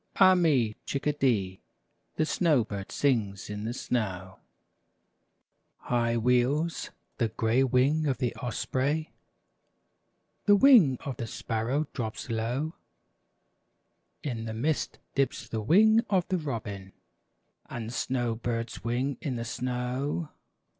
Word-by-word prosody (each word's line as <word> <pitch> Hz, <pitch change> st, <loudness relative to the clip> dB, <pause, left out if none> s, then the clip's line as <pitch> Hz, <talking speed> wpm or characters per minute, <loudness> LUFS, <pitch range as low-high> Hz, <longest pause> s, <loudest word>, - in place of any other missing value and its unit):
Ah 185 Hz, -1 st, +7 dB
me! 150 Hz, -11 st, +3 dB
^ -, -, -37 dB
Chickadee! 130 Hz, -10 st, 0 dB, 0.5 s
The 155 Hz, -, +1 dB
snow 155 Hz, -6 st, +2 dB
bird 100 Hz, -2 st, -6 dB
sings 105 Hz, -8 st, 0 dB
in 105 Hz, +1 st, -5 dB
the 115 Hz, -, -2 dB
snow! 95 Hz, -8 st, -3 dB, 1.4 s
High 120 Hz, -1 st, 0 dB
wheels 125 Hz, +8 st, +1 dB, 0.3 s
the 115 Hz, -, +2 dB
gray 115 Hz, +4 st, +1 dB
wing 135 Hz, +5 st, +2 dB
of 135 Hz, -3 st, 0 dB
the 125 Hz, -2 st, -1 dB
osprey, 140 Hz, +5 st, -1 dB, 1.3 s
The 205 Hz, -, +7 dB
wing 205 Hz, -, +7 dB
of 135 Hz, -, -5 dB
the 115 Hz, -, -4 dB
sparrow 115 Hz, +7 st, -2 dB
drops 115 Hz, 0 st, -4 dB
low; 120 Hz, +8 st, -1 dB, 1.5 s
In 115 Hz, -6 st, -3 dB
the 110 Hz, -1 st, -4 dB
mist 145 Hz, +7 st, -1 dB, 0.2 s
dips 135 Hz, -2 st, -1 dB
the 110 Hz, -, -3 dB
wing 215 Hz, -, +5 dB
of 185 Hz, -3 st, +2 dB
the 185 Hz, -, +1 dB
robin, 110 Hz, -9 st, -5 dB, 0.8 s
And 115 Hz, -1 st, -5 dB
the -, -, -7 dB
snow 120 Hz, -2 st, -1 dB
bird's 115 Hz, 0 st, -4 dB
wing 125 Hz, +3 st, -1 dB
in 140 Hz, -6 st, -2 dB
the 115 Hz, -1 st, -4 dB
snow. 125 Hz, +6 st, -2 dB
125 Hz, 125 wpm, -28 LUFS, 115-145 Hz, 1.5 s, Ah